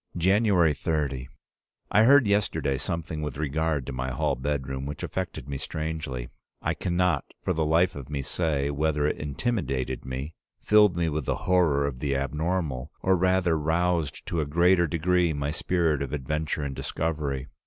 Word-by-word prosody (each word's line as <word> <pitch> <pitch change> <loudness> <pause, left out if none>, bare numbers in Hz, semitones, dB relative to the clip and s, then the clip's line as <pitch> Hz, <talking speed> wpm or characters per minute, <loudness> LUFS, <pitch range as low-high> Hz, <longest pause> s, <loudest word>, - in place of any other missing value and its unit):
"January 95 -3 +4
30. 70 -4 -2 0.6
I 110 +3 +5
heard 140 +1 +7
yesterday 100 -9 +1
something 80 0 -3
with 75 -3 -4
regard 75 -1 -1
to 70 - -5
my 65 +1 -2
hall 65 - 0
bedroom 65 0 -3
which 75 0 -6
affected 95 -8 -4
me 70 -1 -4
strangely. 75 -5 -4 0.3
I - - -1
can 85 -1 -2
not 90 -5 +2 0.2
for - - +1
the 80 - 0
life 85 +4 +3
of 70 -2 -8
me 70 -2 -3
say 70 -2 0
whether 75 0 0
it 75 - 0
intimidated 75 - -2
me, 65 +4 -5 0.3
filled 105 -4 +5
me 85 -1 +1
with 75 -3 -2
the - - 0
horror 85 -6 +3
of 65 -3 -4
the 70 0 -1
abnormal, 75 -1 -2
or 95 0 +4
rather 90 -1 +2
roused 80 0 0
to 85 - -1
a 75 - -2
greater 85 +3 +4
degree 85 +1 +2
my 70 0 -2
spirit 80 -3 0
of 70 -1 -4
adventure 75 +2 -2
and 70 -1 -4
discovery. 75 -5 -2
75 Hz, 170 wpm, -27 LUFS, 70-85 Hz, 0.6 s, heard